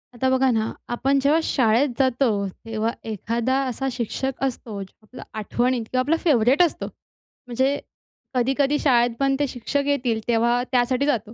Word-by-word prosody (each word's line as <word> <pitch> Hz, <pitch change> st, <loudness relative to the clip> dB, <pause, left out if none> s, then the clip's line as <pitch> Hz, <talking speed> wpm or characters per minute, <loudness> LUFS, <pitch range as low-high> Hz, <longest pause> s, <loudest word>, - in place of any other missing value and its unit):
आता 260 Hz, +2 st, +1 dB
बघा 260 Hz, 0 st, +3 dB
ना, 220 Hz, -1 st, 0 dB, 0.2 s
आपण 270 Hz, +3 st, +1 dB
जेव्हा 290 Hz, +4 st, +3 dB
शाळेत 250 Hz, +2 st, +2 dB
जातो 260 Hz, 0 st, +2 dB, 0.4 s
तेव्हा 225 Hz, 0 st, -1 dB, 0.2 s
एखादा 230 Hz, +4 st, -1 dB
असा 260 Hz, +2 st, -3 dB
शिक्षक 250 Hz, +2 st, -3 dB
असतो 240 Hz, -5 st, -3 dB, 0.3 s
आपला 250 Hz, +4 st, -11 dB, 0.2 s
आठवणीत 240 Hz, +3 st, 0 dB
किंवा 255 Hz, -, +1 dB
आपला 295 Hz, +6 st, +2 dB
फेवरेट 270 Hz, -2 st, +4 dB
असतो. 340 Hz, -, -1 dB, 0.6 s
म्हणजे 260 Hz, +4 st, 0 dB, 0.5 s
कधी-कधी 270 Hz, +3 st, +1 dB
शाळेत 240 Hz, -4 st, +3 dB
पण 275 Hz, 0 st, +2 dB
ते 290 Hz, -, +1 dB
शिक्षक 275 Hz, +3 st, -2 dB
येतील 250 Hz, -6 st, 0 dB
तेव्हा 235 Hz, +1 st, +2 dB
त्यासाठी 255 Hz, +1 st, +2 dB
जातो. 230 Hz, -6 st, -1 dB
255 Hz, 150 wpm, -23 LUFS, 235-275 Hz, 0.6 s, फेवरेट